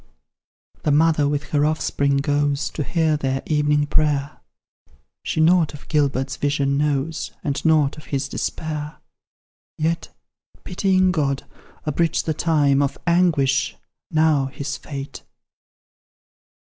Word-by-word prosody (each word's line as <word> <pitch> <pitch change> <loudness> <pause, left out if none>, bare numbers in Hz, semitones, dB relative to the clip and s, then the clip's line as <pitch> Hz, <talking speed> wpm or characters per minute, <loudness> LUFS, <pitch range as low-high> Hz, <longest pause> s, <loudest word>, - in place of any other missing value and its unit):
The 150 - +1
mother 155 -1 +3
with 145 0 -3
her 145 -1 +2
offspring 140 -2 +1
goes 145 0 0
To - - -4
hear 160 +1 +1
their 135 -2 -2
evening 150 -1 +2
prayer; 145 -1 0 0.8
She - - -3
nought 160 -1 +4
of 145 - -14
Gilbert's 135 -3 0
vision 140 -1 0
knows, 145 +2 -1
And 140 -2 -2
nought 155 -3 +3
of 155 - -14
his 140 -1 -2
despair. 150 +1 -4 0.8
Yet, 165 +2 -1 0.5
pitying 185 0 +2
God, 140 -5 -1 0.4
abridge 160 +2 0
the 160 - -1
time 145 -3 +2
Of 140 0 -1
anguish, 165 -6 +2 0.3
now 155 -4 +2
his 140 0 -5
fate! 140 -2 -7
150 Hz, 120 wpm, -22 LUFS, 140-160 Hz, 0.8 s, nought